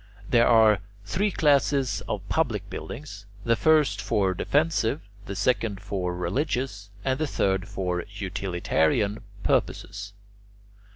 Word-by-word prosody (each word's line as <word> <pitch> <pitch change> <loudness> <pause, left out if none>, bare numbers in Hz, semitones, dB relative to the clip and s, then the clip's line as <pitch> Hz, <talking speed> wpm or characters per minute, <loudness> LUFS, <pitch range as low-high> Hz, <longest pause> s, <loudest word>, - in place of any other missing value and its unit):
There 120 +1 +4
are 110 -3 +6 0.3
three 200 - +1
classes 140 - +2
of - - -3
public - - 0
buildings: 100 - -7 0.2
the 115 0 +3
first 155 +2 +3
for 100 -5 +1
defensive, 145 - +1 0.3
the 100 - -4
second 105 -1 0
for 90 -3 -3
religious, 105 - -2 0.2
and 130 +1 +1
the 155 - 0
third 95 -6 0
for 90 -4 -2
utilitarian 95 0 0 0.2
purposes. 100 0 -1
105 Hz, 115 wpm, -26 LUFS, 95-135 Hz, 0.3 s, are